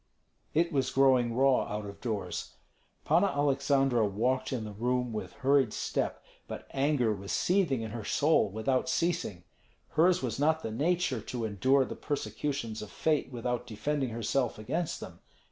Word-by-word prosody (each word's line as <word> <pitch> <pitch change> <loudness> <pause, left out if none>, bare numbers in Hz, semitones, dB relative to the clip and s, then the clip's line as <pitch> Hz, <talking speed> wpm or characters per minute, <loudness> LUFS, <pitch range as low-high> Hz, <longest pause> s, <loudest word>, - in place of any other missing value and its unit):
It 170 +2 +3
was 135 -4 +1
growing 130 -3 +3
raw 135 0 +4
out 105 0 -4
of 100 0 -9
doors. 105 -7 -4 0.5
Panna 170 +6 +4
Aleksandra 140 - +2
walked 115 +6 0
in 125 -4 -2
the 105 - -6
room 125 +3 -1
with 100 -4 -5
hurried 135 -4 +2
step, - - -2 0.2
but - - -7
anger 135 -5 +2
was 100 -1 -6
seething 175 -11 +1
in 110 - -5
her 115 -1 -5
soul 145 -1 +3
without 120 +8 0
ceasing. 165 - -1 0.5
Hers 175 +2 +3
was 120 -1 -2
not 160 +2 +2
the 110 - -3
nature 155 0 0
to 120 +1 -4
endure 130 +6 +3
the - - -6
persecutions 115 -3 -3
of 105 - -7
fate 155 -3 0
without 125 0 -3
defending 135 +4 -1
herself 115 +2 -1
against 155 +10 -3
them. - - -9
130 Hz, 160 wpm, -30 LUFS, 110-145 Hz, 0.5 s, raw